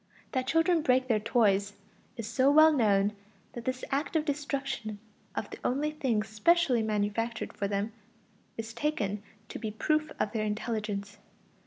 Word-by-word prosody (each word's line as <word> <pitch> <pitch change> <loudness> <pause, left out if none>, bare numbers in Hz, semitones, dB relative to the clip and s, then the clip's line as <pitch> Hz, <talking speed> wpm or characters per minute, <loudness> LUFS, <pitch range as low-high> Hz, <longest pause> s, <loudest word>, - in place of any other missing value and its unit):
That 260 -1 -1
children 325 +3 +3
break 255 -2 +3
their 225 -4 +3
toys 205 -3 +2 0.4
is 230 - -4
so 255 +5 +3
well 310 +2 +7
known 205 -5 +3 0.4
that 235 -2 -7
this 255 0 -2
act 280 +4 -1
of 310 -1 +2
destruction 275 -6 -3 0.4
of - - -4
the - - -8
only 290 +4 0
things 250 -9 0
specially 255 - +3
manufactured 215 +2 -1
for 200 - -2
them 200 +2 -2 0.6
is 225 0 -5
taken 220 -7 -1 0.3
to - - -6
be 220 - -3
a - - -3
proof 305 +7 0
of 210 - 0
their 220 -2 -1
intelligence. 210 -1 -3
230 Hz, 160 wpm, -30 LUFS, 210-280 Hz, 0.6 s, well